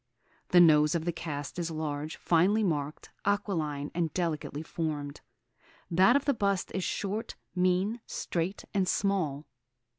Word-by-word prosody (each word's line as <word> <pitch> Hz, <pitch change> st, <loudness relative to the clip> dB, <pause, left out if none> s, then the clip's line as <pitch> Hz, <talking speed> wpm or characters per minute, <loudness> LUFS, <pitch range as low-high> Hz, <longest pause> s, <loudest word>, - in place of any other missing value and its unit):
The 180 Hz, -, +6 dB
nose 150 Hz, -2 st, +6 dB
of 165 Hz, -1 st, -1 dB
the 175 Hz, -, +1 dB
cast 145 Hz, -3 st, -5 dB
is 170 Hz, -1 st, -1 dB
large, 155 Hz, -1 st, -3 dB
finely 190 Hz, +6 st, +3 dB
marked, 150 Hz, -5 st, -2 dB
aquiline, 165 Hz, -8 st, -1 dB
and 165 Hz, -2 st, 0 dB
delicately 160 Hz, -3 st, -2 dB
formed. 150 Hz, -4 st, -4 dB, 0.7 s
That 190 Hz, +8 st, +5 dB
of 280 Hz, -, +2 dB
the 285 Hz, -, +3 dB
bust 200 Hz, -5 st, 0 dB
is 190 Hz, -, -1 dB
short, 205 Hz, +5 st, -3 dB, 0.2 s
mean, 185 Hz, +5 st, +1 dB
straight, 175 Hz, +4 st, -3 dB
and 195 Hz, -2 st, +1 dB
small. 170 Hz, -8 st, 0 dB
170 Hz, 140 wpm, -30 LUFS, 150-195 Hz, 0.7 s, The